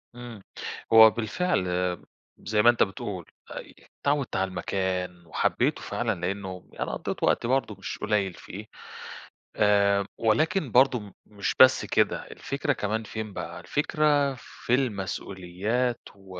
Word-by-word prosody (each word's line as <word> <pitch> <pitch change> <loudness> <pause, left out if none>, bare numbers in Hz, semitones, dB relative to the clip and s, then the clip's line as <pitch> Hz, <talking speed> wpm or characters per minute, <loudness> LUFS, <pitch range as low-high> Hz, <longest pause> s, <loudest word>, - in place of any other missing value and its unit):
امم، 120 -5 -9 0.5
هو 110 0 +10
بالفعل 115 - -1
آمم 90 0 -1 0.4
زي 105 +1 +2
ما 120 - +7
أنت 120 - +4
بتقول 95 -2 -5 0.3
آآ، - - -6 0.4
اتعوّدت 140 -2 0
على 95 0 +1
المكان 90 -2 -3
وحبيته 80 - 0
فعلًا، - - -2
لأنّه 95 0 -4
أنا - - -2
قضّيت - - -5
وقت - - +2
برضه 130 -4 0
مش - - -5
قليل 100 -3 0
فيه، 100 +5 -9 0.9
آآ، 100 -1 +3
ولكن 145 - +1
برضه 125 -6 +3
مش 100 -1 -3
بس 130 -1 +7
كده - - +1
الفكرة 145 +1 -2
كمان 110 0 -2
فين 110 -1 -6
بقى، - - -6
الفكرة 145 -1 +1
في 120 0 -5
المسؤوليات 105 0 -2 0.2
و 95 -2 -11
105 Hz, 130 wpm, -26 LUFS, 95-125 Hz, 0.9 s, هو